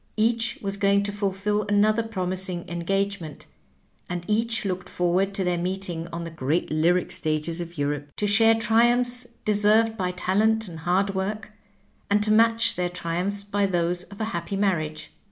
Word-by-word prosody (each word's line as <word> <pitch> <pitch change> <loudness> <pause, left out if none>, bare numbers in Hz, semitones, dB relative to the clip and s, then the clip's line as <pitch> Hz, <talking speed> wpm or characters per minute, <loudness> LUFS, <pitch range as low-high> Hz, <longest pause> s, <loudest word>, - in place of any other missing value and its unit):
Each 230 +1 +1
was 200 0 -2
going 200 0 +3
to 205 - -2
fulfill 205 +1 -1
another 215 +2 +3
promising 185 -4 -2
engagement, 175 -1 -2 0.6
and 175 -1 -4
each 225 +1 0
looked 185 -1 -3
forward 180 +2 +1
to 195 - 0
their 180 -1 0
meeting 180 -2 -3
on 170 0 -5
the 165 - -6
great 155 +2 -1
lyric 170 +4 +2
stages 165 -1 -2
of 170 0 -8
Europe 145 0 -2
to 210 - -1
share 225 +2 +5
tri 225 +1 +4
umphs 245 0 0 0.2
deserved 215 +2 +3
by 185 -3 -1
talent 210 +5 +1
and 165 -3 -8
hard 185 +4 +1
work, 210 +2 -3 0.6
and 205 +1 +3
to 215 - +2
match 230 +1 +4
their 180 0 -1
triumphs 180 +3 -2
by 205 0 0
those 175 -1 0
of 200 - -14
a 220 - -1
happy 175 +4 -3
marriage. 155 -6 -1
195 Hz, 170 wpm, -25 LUFS, 175-210 Hz, 0.6 s, share